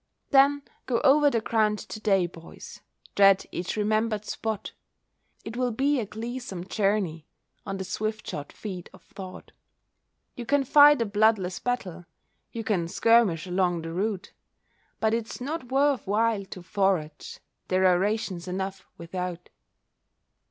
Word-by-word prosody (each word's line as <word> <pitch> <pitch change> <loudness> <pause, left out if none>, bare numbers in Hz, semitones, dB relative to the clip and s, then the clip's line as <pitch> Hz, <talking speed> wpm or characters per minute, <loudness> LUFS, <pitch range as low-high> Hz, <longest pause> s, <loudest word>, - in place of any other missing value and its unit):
Then 280 +1 +5 0.2
go 240 -2 +1
over 290 +1 +5
the 230 -5 0
ground 215 -1 +1
to 215 - -8
day, 195 -4 +2
boys 165 -1 -11 0.3
Tread 195 -1 +5
each 180 +1 -3
remembered 215 0 0
spot. 220 -2 -4 0.7
It 220 - -6
will 250 0 0
be 275 +4 +1
a 220 - -3
gleesome 220 -5 -6
journey, 195 -7 -1 0.4
On 195 0 -3
the 190 - -4
swift 215 +3 -3
shod 145 0 -6
feet 185 -5 -7
of - - -17
thought; 185 -2 -10 0.8
You 240 -2 -7
can 285 -1 +3
fight 290 -1 +7
a - - -4
bloodless 205 -3 +2
battle, 190 -9 -3 0.5
You 230 - -5
can 185 -7 0
skirmish 215 -4 +3
along 180 -2 0
the 165 0 -6
route, 195 +1 -3 0.7
But 220 0 +1
it's 230 -1 -3
not 280 0 -5
worth 275 -3 +2
while 215 0 +1
to 185 -2 -10
forage, 180 -6 -1 0.3
There 185 0 +2
are 180 -1 +5
rations 195 -3 -2
enough 190 +1 -4
without. 180 0 -5
210 Hz, 145 wpm, -26 LUFS, 185-230 Hz, 0.8 s, fight